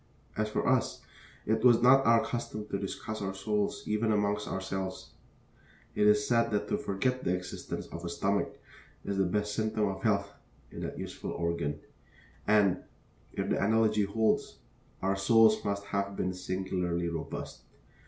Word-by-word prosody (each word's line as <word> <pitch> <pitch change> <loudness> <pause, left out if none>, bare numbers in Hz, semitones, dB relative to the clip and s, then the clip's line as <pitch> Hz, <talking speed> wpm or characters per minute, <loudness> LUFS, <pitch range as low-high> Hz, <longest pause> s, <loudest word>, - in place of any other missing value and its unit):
As 110 0 0
for - - -1
us, 130 -2 +1 0.4
it 110 +1 +1
was 120 -2 +7
not 135 +1 +6
our 115 0 +5
custom 110 -3 -4
to 100 - -2
discuss 105 +2 -5
our 95 -1 -3
souls, 105 +1 -1
even 110 +1 +1
among 105 -1 +2
ourselves. 95 -2 -4 0.8
It 105 - +3
is 105 0 +4
said 115 -1 +3
that 105 -2 -1
to - - +1
forget 125 +6 -1
the 90 - +1
existence 90 0 -5
of 85 - -8
a 85 - -3
stomach 100 +3 -1 0.5
is 100 -1 -2
the 95 - +3
best 105 +3 -1
symptom 110 0 0
of 95 -1 -4
health 100 -2 +1 0.4
in - - -7
that - - -5
useful - - -6
organ, 85 -3 -2 0.7
and, 100 -3 +4 0.6
if - - -2
the - - +1
analogy 110 0 +3
holds, 110 +2 0 0.5
our 95 +1 +2
souls 110 +2 +5
must 100 0 -2
have 100 0 -2
been 90 -1 -1
singularly 90 -2 -2
robust. 85 -2 -5
100 Hz, 160 wpm, -30 LUFS, 95-110 Hz, 0.8 s, was